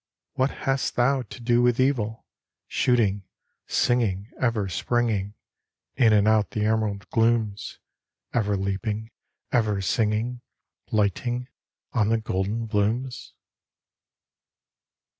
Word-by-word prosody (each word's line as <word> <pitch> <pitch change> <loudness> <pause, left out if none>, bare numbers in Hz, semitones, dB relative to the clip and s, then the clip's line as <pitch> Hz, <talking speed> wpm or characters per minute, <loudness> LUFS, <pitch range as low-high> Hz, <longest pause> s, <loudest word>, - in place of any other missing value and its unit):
What 130 +1 +1 0.2
hast 135 0 0
thou 130 +2 +3
to 120 +1 -10
do 120 0 +2
with 120 0 +3
evil, 115 -5 0 0.4
Shooting, 110 -5 +2 0.5
singing, 110 -4 +1
ever 115 -6 +1
springing 105 0 -1 0.6
In 120 -4 +5
and 105 -1 +4
out 110 -1 +3
the 105 -1 -1
emerald 110 -2 0
glooms, 115 -3 +1 0.6
Ever 105 -4 +1
leaping, 105 +3 -3 0.4
ever 110 -5 +2
singing, 110 +4 0 0.5
Lighting 120 +4 0 0.4
on 110 -4 +2
the 115 - +3
golden 110 +1 -2
blooms? 115 +4 -1
110 Hz, 105 wpm, -25 LUFS, 105-120 Hz, 0.6 s, In